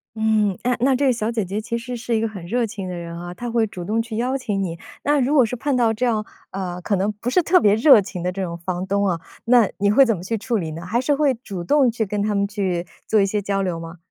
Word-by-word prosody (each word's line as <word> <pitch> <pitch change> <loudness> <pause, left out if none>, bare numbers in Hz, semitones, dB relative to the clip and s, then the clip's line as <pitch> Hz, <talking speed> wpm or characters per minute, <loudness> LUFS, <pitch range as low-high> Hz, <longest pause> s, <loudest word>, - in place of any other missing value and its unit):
嗯， 215 -3 +1
哎， 250 0 +2
那 260 +2 +3
这 280 +2 +1
个 255 - +4
小 225 0 -2
姐 220 -4 -1
姐 200 +4 -3
其 235 +1 -3
实 245 +1 -6
是 235 0 -2
一 220 - +1
个 225 - +1
很 195 -5 -8
热 235 +5 0
情 200 -3 -6
的 180 - -4
人 170 -1 -7
啊， 175 0 -7
她 240 +5 -5
会 230 -2 +2
主 180 -4 -7
动 220 +4 0
去 225 -1 -6
邀 255 +3 0
请 205 -6 -2
你。 170 -2 -4 0.3
那 290 0 +2
如 265 +3 +1
果 260 -5 +6
是 250 - -4
碰 275 +2 -1
到 230 -2 +3
这 250 +3 -1
样， 215 -2 0 0.3
呃， 180 -2 -4
可 200 - 0
能 195 +3 0
不 220 +4 -4
是 360 - +3
特 365 +3 +5
别 205 0 +5
热 230 -2 +7
情 185 -3 -6
的 180 - 0
这 195 - -5
种 170 -2 -3
房 180 +1 -3
东 200 0 +1
啊， 170 -3 0 0.3
那 235 -4 +5
你 200 0 +2
会 270 +6 +7
怎 225 -3 +1
么 175 - -9
去 225 +4 -2
处 230 +2 -1
理 160 -4 -3
呢？ 165 +2 -7
还 230 +6 0
是 285 +3 +1
会 280 -2 +2
主 185 -3 -5
动 265 +5 +3
去 225 -1 -1
跟 205 +1 -2
他 210 0 0
们 200 0 +1
去 190 -4 -2 0.2
做 215 -2 +3
一 - - +4
些 210 +1 -1
交 200 0 -1
流 180 -3 -2
吗？ 165 +1 -9
215 Hz, 320 characters per minute, -22 LUFS, 185-240 Hz, 0.3 s, 热